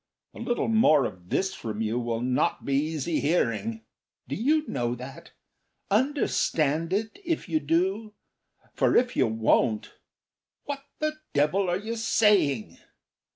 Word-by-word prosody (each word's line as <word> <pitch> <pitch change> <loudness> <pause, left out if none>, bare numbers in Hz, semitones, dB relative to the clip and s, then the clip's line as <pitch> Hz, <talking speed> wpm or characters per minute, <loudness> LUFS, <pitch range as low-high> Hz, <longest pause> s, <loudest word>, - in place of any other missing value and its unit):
A - - -11
little 240 - -1
more 190 - +4
of 90 -4 -8
this 190 0 0
from 110 - -6
you 110 +2 0
will 115 -1 -2
not 130 +7 0
be 140 - -1
easy 155 +2 0
hearing. 115 - 0 0.4
Do 135 - -5
you 300 +8 +1
know 120 -2 -1
that? 135 +6 -10 0.6
Understand 170 - +1
it, 220 - -2
if 335 -3 -2
you 160 -3 +1
do; 190 +8 0 0.6
for - - +2
if 245 0 +3
you - - +3
won't.... 110 0 +1 0.7
What 280 -1 -5
the 310 0 -2 0.2
devil 165 +7 +2
are 175 - +1
you 220 +4 -4
saying! 195 - +2
160 Hz, 140 wpm, -27 LUFS, -, 0.7 s, more